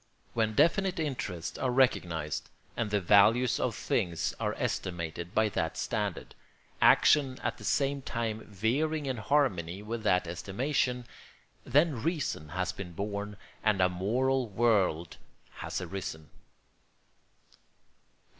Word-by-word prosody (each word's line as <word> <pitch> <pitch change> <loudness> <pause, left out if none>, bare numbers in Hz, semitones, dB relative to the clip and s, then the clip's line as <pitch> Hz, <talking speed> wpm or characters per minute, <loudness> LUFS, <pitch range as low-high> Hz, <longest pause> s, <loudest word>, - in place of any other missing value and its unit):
When 110 -2 0
definite 185 - +3
interests 115 - -3
are 130 - 0
recognised 90 - +1 0.3
and 115 -3 -1
the 105 0 +1
values 105 +6 +4
of - - -1
things 85 -3 -1
are - - -1
estimated 85 0 -3
by 110 0 +4
that 80 -5 -2
standard, - - -3 0.5
action 135 -4 +5
at - - -2
the - - -10
same 140 0 +1
time 115 -3 -3
veering 140 +10 0
in 130 -2 -2
harmony 105 - 0
with 115 +2 -4
that 90 -5 +2
estimation, 125 - -1 0.6
then 145 -2 +3
reason 150 - -2
has 95 0 -1
been 90 -3 -8
born 100 +2 -4 0.3
and 105 -2 +2
a 90 0 +4
moral 120 +7 0
world 95 -7 +1 0.4
has - - -4
arisen. 90 -4 -6
110 Hz, 120 wpm, -30 LUFS, 90-130 Hz, 0.6 s, action